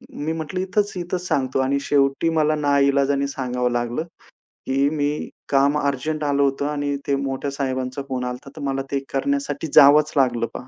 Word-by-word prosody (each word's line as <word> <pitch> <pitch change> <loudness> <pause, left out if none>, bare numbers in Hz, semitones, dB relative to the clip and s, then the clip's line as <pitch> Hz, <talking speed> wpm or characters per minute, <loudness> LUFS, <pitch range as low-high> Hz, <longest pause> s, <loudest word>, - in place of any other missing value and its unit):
मी 155 +2 -2
म्हटलं, 160 +3 -4
"इथंच, 200 +2 0
इथंच," 175 0 -3
सांगतो 130 -4 0
आणि 135 +1 +1
शेवटी 140 +3 +2
मला 155 0 +3
नाइलाजाने 140 -1 +2
सांगावं 125 -2 -2
लागलं, 120 +4 -1 0.6
की 135 +1 +2
मी 150 0 -2 0.2
"काम 140 +1 +3
अर्जंट 150 +2 -2
आलं 140 -1 +1
होतं 140 +1 0
आणि 145 -1 -2
ते 140 - +2
मोठ्या 135 0 -3
साहेबांचा 130 -1 -3
फोन 130 -1 -2
आला 125 - -2
होता 125 +2 -11
तर - - -7
मला 135 0 -1
ते 140 - +1
करण्यासाठी 280 - -1
जावंच 150 +2 +7
लागलं 120 -4 +2
पहा." 125 - -8
140 Hz, 175 wpm, -22 LUFS, 135-150 Hz, 0.6 s, जावंच